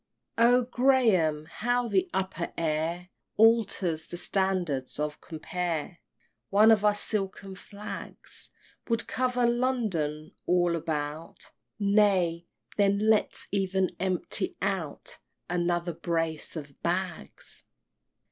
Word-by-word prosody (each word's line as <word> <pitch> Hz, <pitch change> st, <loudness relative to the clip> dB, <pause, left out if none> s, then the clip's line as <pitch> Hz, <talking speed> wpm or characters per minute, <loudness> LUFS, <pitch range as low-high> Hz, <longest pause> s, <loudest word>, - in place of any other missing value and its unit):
X. 230 Hz, -, +5 dB
Oh, 245 Hz, +1 st, +5 dB
Graham! 230 Hz, -, +3 dB
how 245 Hz, +8 st, -1 dB
the 370 Hz, -, +1 dB
upper 190 Hz, -, -2 dB
air 165 Hz, +2 st, -1 dB, 0.3 s
Alters 200 Hz, -8 st, +3 dB
the 175 Hz, -, -7 dB
standards 175 Hz, -9 st, 0 dB
of 150 Hz, 0 st, -3 dB
compare; 170 Hz, 0 st, -4 dB, 0.5 s
One 215 Hz, +3 st, +6 dB
of 215 Hz, -2 st, +4 dB
our 210 Hz, -1 st, +4 dB
silken 195 Hz, -2 st, -3 dB
flags 200 Hz, +2 st, -4 dB, 0.4 s
Would 230 Hz, 0 st, +1 dB
cover 250 Hz, -1 st, +1 dB
London 220 Hz, -, 0 dB, 0.2 s
all 175 Hz, -1 st, +3 dB
about 155 Hz, 0 st, -4 dB, 0.3 s
Nay, 195 Hz, -5 st, +2 dB, 0.3 s
then 200 Hz, +1 st, +3 dB
let's 215 Hz, -, +1 dB
even 190 Hz, -1 st, +1 dB
empty 185 Hz, -2 st, -1 dB
out -, -, -3 dB, 0.3 s
Another 175 Hz, 0 st, 0 dB
brace 165 Hz, -1 st, -2 dB
of 145 Hz, -3 st, -8 dB
bags! 175 Hz, -, -3 dB
185 Hz, 105 wpm, -28 LUFS, 165-215 Hz, 0.5 s, One